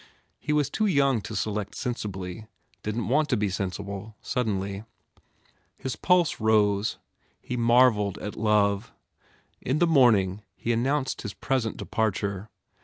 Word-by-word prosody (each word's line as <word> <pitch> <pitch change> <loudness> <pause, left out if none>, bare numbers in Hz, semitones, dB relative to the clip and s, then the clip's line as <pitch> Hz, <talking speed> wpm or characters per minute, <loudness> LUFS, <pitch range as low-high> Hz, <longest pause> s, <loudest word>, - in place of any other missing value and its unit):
He - - -3
was 150 -2 +1
too 215 - +1
young 140 - +3
to - - -7
select 105 -2 -2
sensibly, 105 -4 -5 0.3
didn 105 +3 -2
t - - -4
want 150 +5 +2
to 125 - +2
be 105 -1 0
sensible, 100 +3 -4
suddenly. 100 -4 -2 0.9
His 130 - -4
pulse 180 -3 +2
rose. 105 -1 +2 0.4
He 125 - -5
mar 120 +2 +6
velled 105 -3 -3
at 105 - -6
love. 105 0 +1 0.7
In 130 +4 0
the 175 - +4
morning 110 - +4
he 120 - -1
announced 130 +3 0
his 105 -3 -6
present 130 -5 -1
departure. 100 -2 -2
110 Hz, 140 wpm, -26 LUFS, 100-130 Hz, 0.9 s, mar